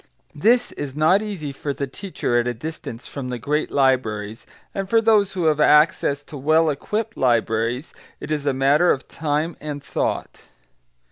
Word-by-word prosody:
This 235 +11 +2
is 140 -2 -6
not 160 +6 +4
easy 190 -9 -5
for 140 +1 -4
the 140 - -2
teacher 135 -5 -2
at 120 - -1
a 120 - -2
distance 125 -3 -7
from 135 -3 -6
the 125 - -3
great 150 +6 -1
libraries, 115 -6 0 0.3
and 195 -1 -4
for 230 - +5
those 215 -3 +3
who 180 -3 -1
have 155 -1 +3
access 150 -1 +4
to 145 - -10
well 155 +3 +3
equipped 215 +10 -3
libraries 120 +2 0 0.3
it - - -7
is 145 -2 -1
a - - +4
matter 140 +6 +3
of 135 - 0
time 155 +2 -2
and 145 -1 -5
thought. - - -3
145 Hz, 175 wpm, -22 LUFS, 130-165 Hz, 0.3 s, for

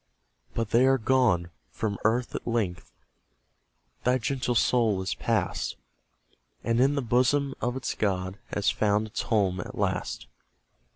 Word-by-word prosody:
But 115 -2 -2
they 125 +3 +5
are 135 0 +4
gone; 110 -9 +2 0.2
from 105 -3 -3
earth 120 +3 +1
at - - -5
length 110 -7 -2 1.1
Thy 125 +1 +3
gentle 130 -1 -1
soul 115 -4 +3
is 95 - -1
pass'd, 105 - -1 0.9
And 115 0 +1
in 140 +2 +3
the 140 - -1
bosom 130 +4 +2
of 125 +1 -1
its 130 - -2
God 95 -1 -2
Has 105 0 +1
found 105 0 +1
its 110 - -4
home 95 -5 +1
at - - -7
last. - - -2
115 Hz, 140 wpm, -27 LUFS, 100-125 Hz, 1.1 s, they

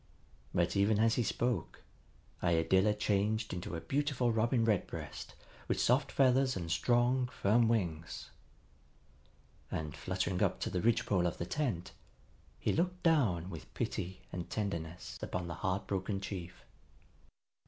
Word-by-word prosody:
But, - - +1
even 100 +2 +3
as 115 +1 +4
he - - +2
spoke, 120 -4 -1 0.6
Iadilla 95 +4 +3
changed 105 +1 +1
into 90 -1 -4
a 80 - -4
beautiful 135 -4 +1
Robin 115 +1 +2
Redbreast 105 -4 -2 0.3
with - - 0
soft 130 +4 +3
feathers 130 0 +4
and 85 -3 -4
strong, 125 +5 +3
firm 115 0 +3
wings. 85 -8 -2 1.4
And, 75 -2 -3
fluttering 95 0 -2
up - - +2
to - - -1
the 90 - 0
ridgepole 110 -6 +2
of 85 - -3
the 85 - -3
tent, 115 - -2 0.7
he - - 0
looked 180 +2 0
down 105 - +2
with 80 -4 -9
pity 95 +1 -3
and 90 -1 -5
tenderness 85 -5 -4
upon 90 -1 -3
the 85 - -4
heart 95 +2 0
broken 95 +1 -2
chief. 90 -3 -7
100 Hz, 135 wpm, -33 LUFS, 90-120 Hz, 1.4 s, as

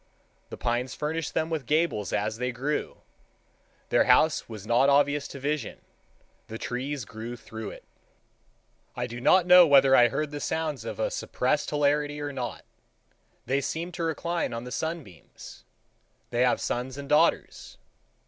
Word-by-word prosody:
The - - -8
pines 120 +1 -2
furnished 155 0 -3
them 160 +1 0
with 155 -6 -3
gables 150 - 0
as 105 +1 -1
they 125 0 -1
grew. 135 +5 -3 0.9
Their - - +3
house 155 -5 +3
was 110 -3 -8
not 120 +5 +3
obvious 145 0 +2
to 140 - -9
vision; 145 -3 -3 0.7
the 110 - -6
trees 130 +2 -4
grew 110 +4 -7
through 110 -2 -8
it. - - -11 1.1
I - - -2
do 120 +1 -7
not 185 +7 +5
know 180 -1 +8
whether 135 -2 +6
I 120 -2 +7
heard 145 +5 -3
the 145 - -5
sounds 155 -1 -3
of - - -6
a - - 0
suppressed - - -1
hilarity 145 0 +1
or 145 -1 -4
not. 125 -3 -5 0.8
They 135 +3 0
seemed 170 +5 -4
to 170 - -4
recline 170 0 -2
on 115 0 -5
the 125 - -8
sunbeams. 160 - -7 0.7
They 120 0 0
have 125 -1 +3
sons 125 +2 -3
and 140 0 -7
daughters. 150 - +1
140 Hz, 160 wpm, -27 LUFS, 120-155 Hz, 1.1 s, know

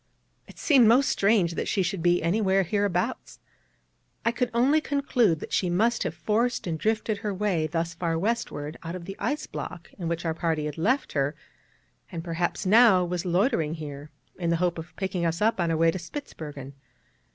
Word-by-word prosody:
It - - -15
seemed 265 -7 +5
most 255 +5 +5
strange 200 -4 +2
that - - -3
she 195 - +1
should 180 0 -2
be 175 0 +2
anywhere 195 +2 +2
hereabouts: 195 -1 -1 0.9
I 230 - +4
could 250 +1 -1
only 265 +7 +3
conclude 250 - +1
that - - -7
she 180 - +1
must 225 +7 +1
have - - -2
forced 235 +3 0
and 165 -3 -3
drifted 215 0 0
her 210 -1 -3
way 190 -5 0
thus 165 +1 -2
far 165 -1 -1
westward 165 -7 -2
out 165 +2 -5
of 175 -2 -7
the 195 +1 -7
ice 300 +1 -2
block - - -7
in 170 - -3
which 170 +1 -3
our 165 - 0
party 160 -2 -1
had 150 +1 -5
left 255 - +1
her, 140 +1 0 0.8
and 165 -2 -5
perhaps 175 +3 -2
now 200 -3 +6
was 175 0 -3
loitering 175 - +1
here 145 -2 -8 0.3
in 170 -2 -1
the 170 - +3
hope 175 0 0
of 165 +2 -10
picking 190 -3 -2
us 165 0 0
up 220 -1 +2
on 170 -1 +1
our 165 - +1
way 165 +1 +4
to 185 - -5
Spitzbergen. 150 - -8
180 Hz, 195 wpm, -26 LUFS, 165-220 Hz, 0.9 s, now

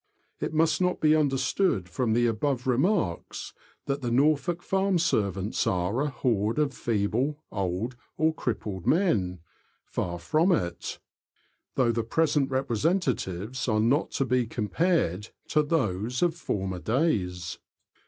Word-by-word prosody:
It - - -2
must 155 +1 +2
not 180 0 +1
be 155 0 +4
understood, 135 - +1
from 110 +5 0
the 120 +1 +3
above 120 +3 0
remarks, 130 - 0 0.3
that 140 +1 -2
the 120 - -1
Norfolk 150 +6 +2
farm 195 -1 +1
servants 100 - 0
are 95 +7 0
a 150 - 0
horde 115 -4 0
of 150 -2 +1
feeble, 120 +7 -1
old, 100 +5 -2 0.2
or 160 +1 +3
crippled 105 - -4
men; 100 - +2 0.4
far 85 -1 -3
from 155 - +2
it, 85 - -2 0.8
though 125 -3 +3
the 115 0 0
present 145 +3 +1
representatives 130 - -1
are 110 -3 +2
not 125 +9 +2
to 135 - +1
be 125 -1 +1
compared 110 - 0 0.2
to 150 - +4
those 125 - 0
of 175 -2 +3
former 95 - -3
days. 90 - -1
125 Hz, 135 wpm, -27 LUFS, 100-155 Hz, 0.8 s, be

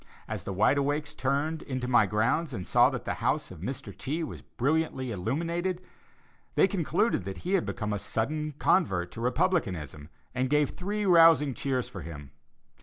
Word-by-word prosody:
As - - -5
the - - -3
Wide 105 +9 +3
Awakes 145 +2 -1
turned 150 +3 -1
into 130 -3 -4
my 120 -4 +4
grounds 125 - +1
and 95 -6 -4
saw - - +5
that - - -5
the - - -1
house - - 0
of 90 - -10
Mr. 130 - -5
T. 155 +5 -3
was 155 - -6
brilliantly 135 -2 -1
illuminated, 170 - -2 0.8
they - - +5
concluded 190 - 0
that 95 - -7
he 185 - 0
had 195 - +2
become 105 -2 -3
a 105 - -2
sudden 150 +9 -2
convert 95 - +2
to 115 - -8
Republicanism, 95 - -1 0.2
and 130 0 0
gave 150 -1 +2
three 205 +3 -3
rousing 165 -6 +6
cheers 130 -1 -1
for 95 - -8
him. 75 -5 -9
140 Hz, 175 wpm, -28 LUFS, 105-160 Hz, 0.8 s, rousing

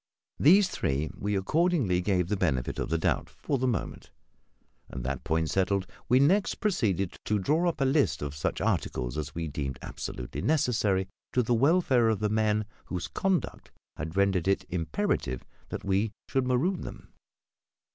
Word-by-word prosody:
These 185 +7 +6
three 75 - -1
we 100 +1 -2
accordingly 130 - +2
gave 90 -2 +1
the 105 - 0
benefit 70 -10 -1
of - - -2
the 85 - +1
doubt, 80 - 0
for 140 - -3
the 130 - +1
moment; 115 -6 -3 0.8
and, 65 - -6
that 65 +1 -3
point 80 0 0
settled, 95 0 +1 0.2
we 125 - +6
next 185 +9 +3
proceeded 100 - 0
to 105 - +1
draw 155 - +2
up 170 - -5
a - - +4
list 135 - +2
of 70 -1 -4
such 75 - -2
articles 60 -1 -1
as 75 -1 -4
we 85 -1 -2
deemed 70 -3 -4
absolutely - - -5
necessary 110 -10 +1 0.3
to 125 - +3
the 120 - +1
welfare 130 -2 +4
of 110 - +2
the 105 0 0
men 110 0 +1 0.2
whose 90 -2 -4
conduct 190 -2 -1 0.3
had 80 +3 -5
rendered 95 -3 +2
it 100 - +2
imperative 80 -7 -1 0.2
that - - -5
we 100 +3 +1 0.2
should 135 -2 0
maroon 160 +9 +1
them. - - -9
100 Hz, 165 wpm, -28 LUFS, 80-135 Hz, 0.8 s, These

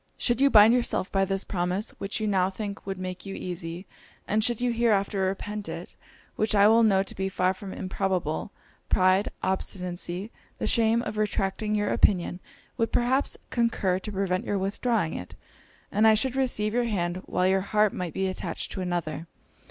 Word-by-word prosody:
Should 240 +1 +1
you 280 - +6
bind 215 -1 +8
yourself 240 -5 0
by 195 -1 +2
this 195 0 -1
promise, 185 +3 -2
which 195 +3 -3
you 215 - -1
now 190 -3 +2
think 200 0 -6
would 195 -1 -3
make 185 0 -5
you 195 -1 -6
easy, 175 0 -5 0.4
and 215 +1 +1
should 235 0 +2
you 245 0 +1
hereafter 210 -4 +1
repent 200 +1 -3
it, 165 +2 -7 0.4
which 215 0 +1
I 200 - +6 0.2
know 195 -4 +4
to 195 - -7
be 190 0 -2
far 185 0 +1
from 190 0 -9
improbable, 185 -2 -2 0.4
pride, 185 +2 +3
obstinacy, 185 +1 -3 0.3
the - - -3
shame 230 0 +3
of 215 - -4
retracting 210 0 -1
your 205 0 0
opinion, 180 -2 +2 0.4
would 230 - 0
perhaps 260 +3 +1
concur 215 -6 +1
to 210 - -6
prevent 190 0 -1
your 205 - -1
withdrawing 200 -1 0
it; 90 - -7 0.6
and 215 +2 +4
I 220 - +7
should 255 +4 +1
receive 230 -5 0
your 245 0 +1
hand 175 -6 -1
while 180 - 0
your 190 0 +3
heart 210 +1 +2
might 180 -4 -4
be 190 - 0
attached 185 -2 -4
to 190 - -4
another. 175 -2 -3
195 Hz, 180 wpm, -27 LUFS, 185-215 Hz, 0.6 s, bind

